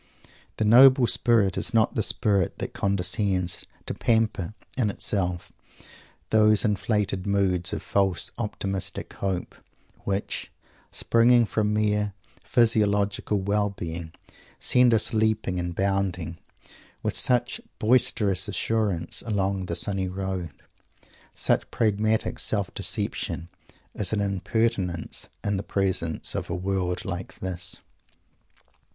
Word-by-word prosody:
The 110 - +1
noble 130 +3 +8
spirit 115 -5 +3
is - - -1
not 110 0 +3
the 110 - 0
spirit 95 0 +1
that - - -5
condescends 95 -1 0 0.2
to - - -3
pamper 110 -4 0 0.2
in 120 -5 +1
itself 90 -3 -1 0.8
those 110 0 +4
inflated 105 -2 0
moods 95 -3 +1
of - - -4
false 95 -3 0
optimistic 100 -4 -3
hope, 95 -2 -3 0.5
which, 100 +1 -3 0.4
springing 120 +1 +4
from 105 -1 0
mere 105 -1 +1 0.3
physiological 105 -3 +2
well 105 +1 +1
being, 85 -3 -6 0.5
send 125 -1 +4
us 110 0 +2
leaping 110 -4 +1
and 85 -1 -3
bounding, 95 -4 -1 0.6
with - - -1
such 120 -1 +1 0.2
boisterous 110 -5 +2
assurance, 105 -4 -1
along 100 -3 -1
the 85 - -2
sunny 95 +2 -1
road. 95 -2 -3 0.9
Such - - 0
pragmatic 110 0 0
self - - -1
deception 85 - -3 0.4
is 100 -4 -1
an 105 - +1
impertinence 100 -3 -1
in 100 -1 0
the - - -2
presence 95 -5 -1
of - - -4
a 85 - -1
world 90 -1 -2
like 95 0 -5
this. 90 -1 -4
100 Hz, 115 wpm, -26 LUFS, 95-110 Hz, 0.9 s, noble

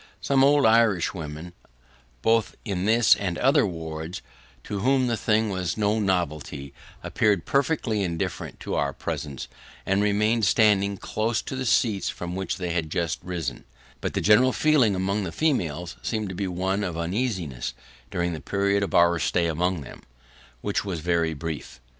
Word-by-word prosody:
Some 135 -1 +2
old 145 +1 +5
Irish 110 -5 +4
women, 80 0 -7 0.7
both 115 -1 +2
in 95 -3 -2
this 115 +1 +5
and 90 -4 -3
other 135 -2 +4
wards, 80 0 -6 0.4
to 100 - -4
whom 130 +4 +3
the 120 -1 +1
thing 110 -1 +1
was 95 -2 -2
no 105 +1 +1
novelty, 75 -8 -2 0.3
appeared 100 -5 +1
perfectly 140 -7 +1
indifferent 85 -4 -3
to - - -4
our 70 -1 0
presence, 70 0 -5 0.4
and 95 +1 +2
remained 105 +2 +2
standing 100 -1 +3
close 110 +3 -1
to - - -5
the 130 -1 -3
seats 110 -3 +2
from 90 0 -5
which 95 -1 -3
they 90 -2 -3
had 85 -2 -1
just 85 0 -1
risen; 85 -6 -4 0.4
but - - -4
the - - +1
general 120 +5 +5
feeling 140 -10 +3
among 100 +3 -1
the 85 - -4
females 90 - -1
seemed 110 -3 -2
to - - -5
be 100 +1 -2
one 95 +3 -1
of 85 -4 -3
uneasiness 85 - -2 0.3
during 85 0 -1
the 80 - -6
period 100 0 +1
of 100 - -2
our 85 0 +5
stay 85 +1 +1
among 85 +1 0
them: 65 - -11 0.6
which 100 - -1
was 95 -5 -4
very 85 -1 +1
brief. 80 -3 -6
95 Hz, 165 wpm, -25 LUFS, 85-110 Hz, 0.7 s, old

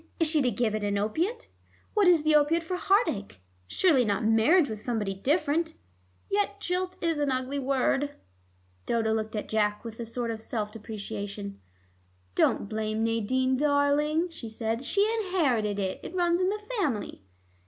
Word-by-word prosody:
Is 325 - +3
she 305 -1 +3
to 255 - +3
give 235 -3 0
it 215 -1 -2
an 205 0 0
opiate? 335 - -1 0.5
What 415 -4 +4
is 340 -4 +5
the 310 0 +3
opiate 305 +3 +4
for 360 +3 -3
heart 395 +5 +3
ache? 200 - -4 0.3
Surely 305 - +3
not 205 -1 0
marriage 230 +10 +4
with 215 -3 -6
somebody 215 -4 -2
different. 305 - 0 0.5
Yet 405 0 0
jilt 370 -1 -2
is 330 -3 +1
an 290 -1 +1
ugly 260 +2 -1
word." 275 +2 0 0.7
Dodo 225 -1 +1
looked 220 0 -2
at 210 - -3
Jack 210 0 0
with 225 0 -8
a 230 - -4
sort 235 0 -3
of 220 -1 -6
self 215 -2 -3
deprecation. 205 -2 -6 0.7
"Don't 200 - +2
blame 215 +1 -2
Nadine, 255 +4 +1
darling," 295 +3 +2
she 250 -9 -8
said. 225 +3 -3
"She 400 +9 +3 0.2
inherited 255 - +1
it; 190 -2 -2
it 370 - -8
runs 350 0 +2
in 370 - +2
the 420 +1 -3 0.2
family." 255 - -2
255 Hz, 170 wpm, -28 LUFS, 220-325 Hz, 0.7 s, is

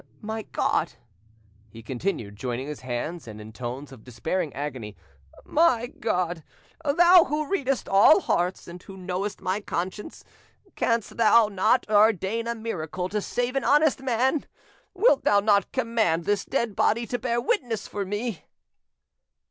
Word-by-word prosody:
My 220 +1 -4
God!" - - 0 0.8
he 115 +2 -12
continued, 125 - -3
joining 125 +3 -4
his 150 0 -6
hands 130 +6 -5
and 110 -1 -9
in 110 +1 -11
tones 125 +4 -6
of 125 -5 -13
despairing 150 +7 -3
agony,—"my 125 - -2
God, 180 -6 -1 0.4
Thou 345 +4 +6
who 300 0 -2
readest 275 -9 -1
all 205 - +6
hearts, 180 - -1
and 175 +1 -10
who 190 +1 -12
knowest 185 +2 -4
my 190 +3 -2
innocence, 185 +4 -4 0.5
canst 230 -2 -1
Thou 225 -1 +5
not 200 +5 +2
ordain 215 +1 +2
a 235 - -2
miracle 185 -5 -4
to 210 +1 -2
save 245 +5 -2
an 270 - 0
honest 295 -1 +3
man? 260 +3 0 0.5
Wilt 385 - +3
Thou 205 - +4
not 200 -1 +2
command 225 -10 0
this 205 -1 0
dead 235 -6 -1
body 235 +5 +2
to 245 +1 -3
bear 235 0 -1
witness 240 - -1
for 205 - -4
me?" 205 +1 -4
205 Hz, 145 wpm, -25 LUFS, 160-235 Hz, 0.8 s, Thou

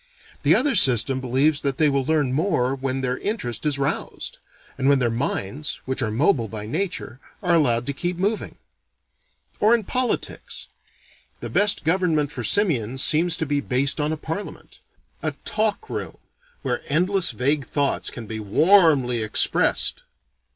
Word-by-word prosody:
The - - +4
other 275 +2 +3
system 130 - +3
believes 135 +4 +1
they 140 +2 +1
will 140 -1 +1
learn 145 -3 0
more 145 -5 +1
when 135 0 -2
their 125 0 -2
interest 155 - -3
is 145 -2 +1
roused; 140 +1 -3 0.4
and 135 +1 +1
when 140 - +5
their 120 -3 0
minds, 130 +3 -3
which 130 0 -1
are 110 - 0
mobile 120 - +1
by 105 0 -6
nature, 155 - -4 0.2
are 180 -2 +2
allowed 120 -7 +2
to 140 - -3
keep 175 +5 -3
moving. 205 +4 -2 1.0
Or 220 +3 +5
in 230 - -2
politics: 250 +5 -2 0.7
the - - -7
best 205 0 +2
government 160 -3 +1
for - - -5
simians 135 - +1
seems 165 +2 +3
to 160 - -2
be 145 -1 -1
based 135 +3 +1
on 150 +1 0
a 160 - -2
parliament: 160 +7 -7 0.4
a - - -1
talk 220 - -1
room, - - -5 0.5
where - - -2
endless 180 +5 +2
vague 135 +5 -1
thoughts 140 -1 -1
can 120 - -8
be 110 +1 -6
warmly 135 - +4
expressed. 110 0 +1
145 Hz, 155 wpm, -23 LUFS, 125-175 Hz, 1.0 s, when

